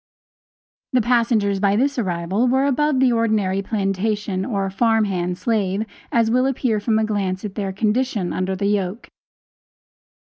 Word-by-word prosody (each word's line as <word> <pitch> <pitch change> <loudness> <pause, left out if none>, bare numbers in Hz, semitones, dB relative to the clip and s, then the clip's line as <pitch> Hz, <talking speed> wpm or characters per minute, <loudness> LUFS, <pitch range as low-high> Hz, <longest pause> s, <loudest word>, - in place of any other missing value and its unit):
The 255 - +4
passengers 225 -4 +1
by 200 0 +2
this 270 +4 +1
arrival 185 +3 0
were 265 +2 +2
above 285 0 +1
the 260 -1 +4
ordinary 215 -5 +1
plantation 200 -1 -1
or 195 -3 -1
farm 225 +2 +2
hand 180 -2 -2
slave, 210 -2 -1 0.3
as 230 -1 +2
will 255 +2 +3
appear 245 -5 0
from 220 +1 +1
a 220 - +2
glance 195 -3 -2
at 205 - -5
their 195 -2 -3
condition 215 -1 -1
under 185 +1 -1
the 200 - -2
yoke. 200 +1 -1
210 Hz, 150 wpm, -21 LUFS, 195-235 Hz, 0.3 s, The